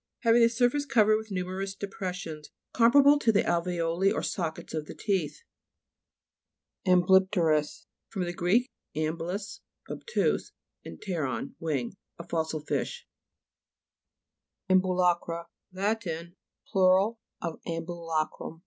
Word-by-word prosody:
Hav 230 -2 +4
ing 240 - +5
the 230 - +6
surface 250 +4 +1
covered 215 -3 +4
with 220 0 -7
nu 185 -2 -2
merous 195 +1 -4
depressions, 180 -6 -5 0.2
comparable 280 +5 +6
to 235 - +3
the 205 - +3
alve'oli 170 +2 +1
or - - -1
sockets 165 -4 -3
of 155 -1 -3
the - - -8
teeth. 195 - -2 1.4
AMBLY'PTKRUS 180 -4 +3 0.2
fr. 180 -5 -2
gr. 175 0 -3 0.5
amblus, 165 +6 -3 0.3
ob - - -6
tuse, 470 - 0 0.3
pteron, 155 - -4
wing. 145 -6 -2 0.2
A 170 - -9
fossil 160 -2 -2
fish. 480 - -3 1.7
AMBULA'CRA 180 -2 +2 0.3
Lat. 205 +4 -1 0.6
plur. 190 +3 +4 0.3
of 165 -2 -5
ambula 165 -1 -2
crum. 165 - -9
180 Hz, 115 wpm, -28 LUFS, 165-205 Hz, 1.7 s, the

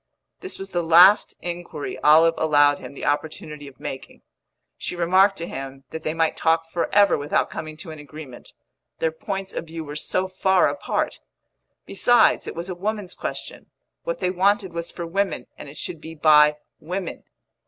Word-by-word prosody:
This 380 - -6
was 195 0 -8
the 175 - 0
last 175 +5 +6
inquiry 170 -4 -5
Olive 160 +2 +6
allowed 145 -2 +4
him 140 - -10
the - - -6
opportunity 150 0 -3
of 135 -2 -14
making. 135 - -8 0.5
She - - -5
remarked 190 +3 +3
to 170 - -4
him 135 0 -7
that 160 - -5
they 155 0 -3
might 165 -1 +1
talk 165 0 +1
for 170 - -2
ever 200 -6 +4
without 145 +1 0
coming 155 -1 -6
to 165 0 -9
an 155 - -9
agreement 145 -3 -11 0.5
their 160 - 0
points 195 +4 -5
of - - -4
view 165 0 -6
were 145 -1 -8
so 185 +5 -1
far 185 0 +3
apart. - - -2 0.7
Besides, 240 -2 +3
it - - -6
was 170 +2 -5
a 185 - -4
woman's 200 +1 -4
question; - - -6 0.3
what - - -3
they 180 - 0
wanted 190 0 +1
was 170 0 -4
for 170 - -6
women, 195 +1 -1
and 145 - -10
it 145 - -12
should 165 -4 -6
be 160 +1 -9
by 150 -1 +5 0.2
women. 180 +2 -5
165 Hz, 180 wpm, -23 LUFS, 150-185 Hz, 0.7 s, last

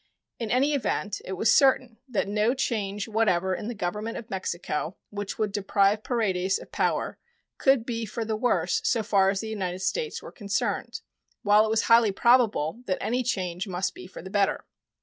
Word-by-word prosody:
In 230 -2 -3
any 270 +5 +2
event, 205 -7 -1
it 190 - -4
was 205 +4 +2
certain 260 -4 +3
that 215 -5 0
no 210 +5 +1
change 210 -6 -2
whatever 190 -5 +1
in 205 - -4
the 240 - -4
Government 210 +4 -3
of 230 0 -9
Mexico 175 -2 -3
which 205 -1 -5
would 215 -2 0
deprive 200 +1 +2
Paredes 195 -6 0
of - - -13
power - - -1 0.4
could 270 -4 +3
be 230 -2 -3
for 225 +3 -4
the 220 0 -1
worse 250 - +1
so 235 - +1
far 200 -3 +3
as 195 0 -1
the 220 - -5
United 185 -3 -3
States 460 - -2
were - - -9
concerned, 205 -3 -2 0.4
while 210 +1 +5
it - - -3
was 220 0 +2
highly 230 -2 +5
probable 230 -4 +3
that 185 - 0
any 245 +3 0
change 185 -6 -2
must 185 0 -2
be - - -10
for 185 - -10
the 190 - -9
better. 200 -1 +1
210 Hz, 190 wpm, -26 LUFS, 195-230 Hz, 0.4 s, while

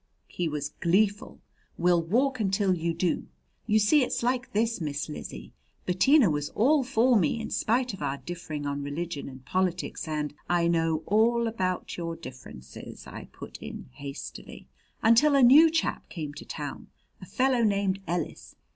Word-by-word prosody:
He 175 - -2
was 150 -1 -4
gleeful. 200 +4 +1 0.4
"We'll 175 0 +3
walk 255 +10 +1
until 195 -2 +2
you 170 -1 -1
do! 170 +1 -1 0.4
You 215 -1 +4
see 220 +8 +4
it's 245 - -1
like 245 0 0
this, 225 -1 0
Miss 150 -1 -3
Lizzie. - - -8 0.3
Bettina 240 +8 +4
was 150 -2 -1
all 275 +6 +4
for 250 -1 +3
me, 210 +3 +2
in 225 - -6
spite 245 +1 0
of 195 - -9
our 135 - -2
differing 155 0 -6
on 145 0 -2
religion 145 +1 -4
and 130 -1 -13
politics 185 -2 -1
and 150 -1 -2
" - - -35
"I 170 - +2
know 165 -2 +1
all 230 +3 +3
about 185 -5 -2
your 165 -1 -4
differences," 125 - -11
I - - -9
put - - -10
in - - -8
hastily. 140 - -9 0.4
"Until 240 +6 +5
a 275 - +5
new 295 +7 +8
chap 325 0 -1
came 155 -5 -6
to - - -10
town - - -6 0.3
a - - -8
fellow 255 -1 +1
named 200 -2 +1
Ellis. 170 -2 -4
185 Hz, 165 wpm, -27 LUFS, 155-230 Hz, 0.4 s, new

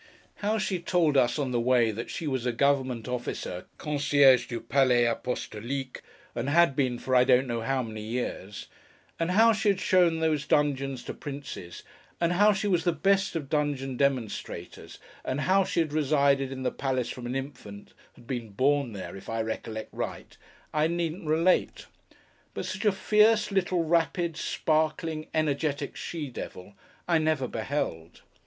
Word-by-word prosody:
How 210 +2 0
she 190 -3 -1
told 170 -3 +1
us, 125 0 +3
on 140 -4 -1
the 120 - +1
way, 120 -2 +3
that 115 +3 -6
she 165 - -5
was 130 -4 -1
a - - +2
Government 130 -2 +1
Officer 120 -7 -4
(concierge 145 -4 +4
du 120 - -4
palais 125 -3 +3
a 120 - +2
apostolique), 125 +2 -5 0.3
and 140 - -2
had 170 -2 +4
been, 130 -3 0
for 130 +1 -1
I 125 - +7
don't 130 0 +4
know 120 -2 -3
how 130 +2 0
many 110 -2 -7
years; 110 -3 -4 0.5
and 165 +1 0
how 225 +5 +5
she 210 0 +1
had 195 -2 +1
shown 175 -3 +3
these 155 -3 0
dungeons 135 -3 +1
to - - -6
princes; 140 -11 -8 0.4
and 170 0 +2
how 205 +4 +5
she 205 +1 -1
was 175 -4 +2
the 175 - +2
best 195 +3 +1
of 150 -4 -3
dungeon 140 -3 -1
demonstrators; 130 -5 -3 0.3
and 130 +3 -2
how 190 +5 +3
she 170 - 0
had 155 -3 -3
resided 140 -2 +2
in 130 -1 -5
the 125 - 0
palace 130 -3 -2
from 120 -1 -7
an 125 - -3
infant,—had 120 -5 -9
been 120 -3 -4
born 135 +1 +1
there, 95 -1 -7
if 95 - -10
I 115 0 -1
recollect 110 0 -5
right,—I 155 +1 -4
needn't 170 0 -3
relate. 165 +4 +2 0.7
But - - -3
such - - -4
a 210 - +5
fierce, 210 +2 +3
little, 185 -3 +1
rapid, 165 0 +1
sparkling, 155 0 -1
energetic 145 -2 -1
she 150 -6 -5
devil 95 -4 -8 0.3
I 170 -2 +3
never 155 -4 0
beheld. 110 - -4
140 Hz, 165 wpm, -28 LUFS, 125-165 Hz, 0.7 s, I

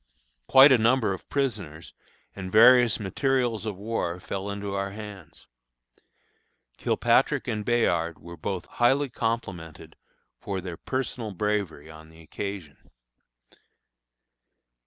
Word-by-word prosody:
Quite 135 +2 +8
a 130 - +5
number 115 -2 +2
of 95 - -10
prisoners 100 - -3 0.4
and 95 -1 -7
various 120 +1 +6
materials 120 +1 -1
of 105 -3 -4
war 100 -4 -3
fell 100 +2 -5
into 100 0 -5
our 100 0 -2
hands. 100 -4 -10 1.3
Kilpatrick - - +1
and 105 -1 -2
Bayard 85 -9 +1
were 85 0 -11
both 90 +3 -4
highly 135 +4 +1
complimented 100 -10 -4 0.4
for 95 -1 -4
their 90 -2 -6
personal 125 -4 -4
bravery 95 -6 -2
on 80 0 -14
the 80 0 -17
occasion. 90 -2 -7
100 Hz, 115 wpm, -26 LUFS, 90-120 Hz, 1.3 s, Quite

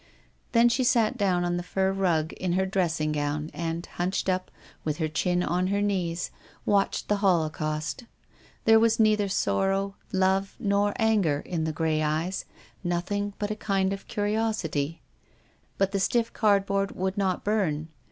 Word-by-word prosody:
Then 235 0 +6
she 240 +2 +2
sat 240 -1 +3
down 190 -6 +1
on 175 0 0
the - - -2
fur 190 +2 0
rug, 170 -5 +1
in 180 -2 -2
her 190 +1 +2
dressing 170 -5 0
gown, 150 +1 -2
and 165 0 -3
hunched 185 +2 -2
up, 185 0 -1 0.3
with 155 -1 -2
her 160 -2 0
chin 175 +3 0
on 180 +1 0
her 200 +1 +1
knees, 180 -4 -1 0.3
watched 200 -1 +1
the 210 - +2
holocaust. 160 - 0 0.6
There 225 0 +7
was 225 0 +3
neither 215 -2 +3
sorrow, 195 - +1 0.2
love, 190 +1 +1
nor 200 0 +1
anger 205 - +2
in 165 -3 -2
the 160 - 0
grey 155 0 0
eyes, 155 +5 -1 0.4
nothing 195 +4 -1
but 205 0 -2
a - - -1
kind 195 -2 0
of 195 - -4
callous - - -13
curiosity. 205 -8 -1 0.8
But 195 0 +2
the 200 - 0
stiff 230 +4 +1
cardboard 195 -2 +2
would 190 +1 -1
not 190 -3 0
burn. 170 -8 0
190 Hz, 160 wpm, -27 LUFS, 165-205 Hz, 0.8 s, There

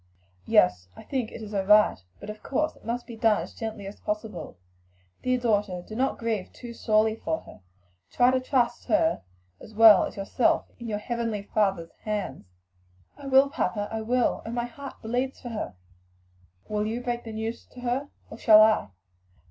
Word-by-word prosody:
"Yes; 90 0 +4
I - - -11
think 255 -5 -3
it 225 - -8
is 210 - -8
her 200 -2 0
right. 210 - +5 0.2
But 210 - -6
of 210 - -12
course 305 +3 -1
it - - -21
must 235 +2 -3
be 235 - -9
done 220 -1 +2
as - - -10
gently 220 -3 -6
as 200 +1 -9
possible. 210 - -5 0.6
Dear 255 0 +1
daughter, 205 -6 0
do 215 - -8
not 265 +3 0
grieve 225 -5 -2
too 240 -1 -9
sorely 220 -1 +2
for 160 -6 -2
her; - - -15 0.5
try 245 +1 +4
to 260 - +2
trust 255 -2 0
her 320 +1 +2 0.4
as 215 - -13
well 220 -3 +8
as - - -8
yourself 200 +5 +1
in 235 - -7
your 210 -2 -2
heavenly 230 -1 -3
Father's 195 -5 0
hands." 205 - -4 0.7
"I 280 - -10
will, 270 +1 +5
papa, 205 -9 -1
I 225 0 -3
will! 245 +2 +1
but - - -7
oh - - -5
my 240 0 -1
heart 275 +3 -9
bleeds 250 +4 -2
for 245 - -7
her!" 215 - -5 0.9
"Will 210 0 -1
you 230 +3 -3
break 240 -1 -2
the 225 - -7
news 220 +1 -4
to 250 - -13
her? 250 +4 -2 0.2
or - - -9
shall 215 -2 +8
I?" 215 - +3
225 Hz, 190 wpm, -26 LUFS, 210-245 Hz, 0.9 s, well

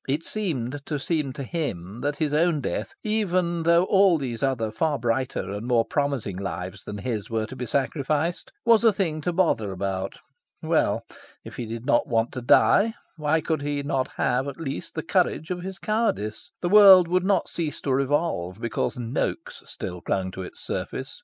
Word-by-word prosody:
It 145 +4 0
seemed 145 - -2
to 150 - -1
seem 150 -1 -1
to 140 - -6
him 120 - -4
that 145 0 -1
his 150 -1 -1
own 160 0 +3
death, 135 - -3
even 185 -6 +1
though 170 +1 +4
all 190 -2 +4
those 125 -6 -4
other 125 -5 0
far 145 +7 0
brighter 120 -4 -1
and 105 +4 -5
more 120 -2 +3
promising 140 -10 -1
lives 95 -1 -5
than 105 - -6
his 110 -1 -3
were 110 -1 -1
to 130 - -9
be 125 -1 -5
sacrificed, 145 +6 -1
was 230 -1 +5
a 225 - +7
thing 170 -6 -1
to 175 - -1
bother 165 - +1
about. 95 0 -3 0.5
Well, - - +1 0.4
if - - -10
he 120 - -4
did 115 +2 -6
not 120 - +3
want 115 0 +1
to 125 - -5
die, 215 - +4 0.2
why 155 0 +1
could 160 -3 -1
he 145 0 -2
not 135 -2 0
have, 130 +3 +1
at 140 - -6
least, 140 -4 -5
the - - -2
courage 160 - 0
of 180 -1 -3
his 190 +1 -6
cowardice? 215 - -1
The 175 - +1
world 195 -3 +9
would 180 +1 +1
not 190 -1 +2
cease 160 -3 -3
to 135 - 0
revolve 135 - 0
because 115 -1 -2
Noaks 120 0 -3
still 90 -1 -6
clung 95 -1 -1
to 95 - -7
its 90 - -9
surface. - - -4
140 Hz, 190 wpm, -25 LUFS, 115-170 Hz, 0.5 s, world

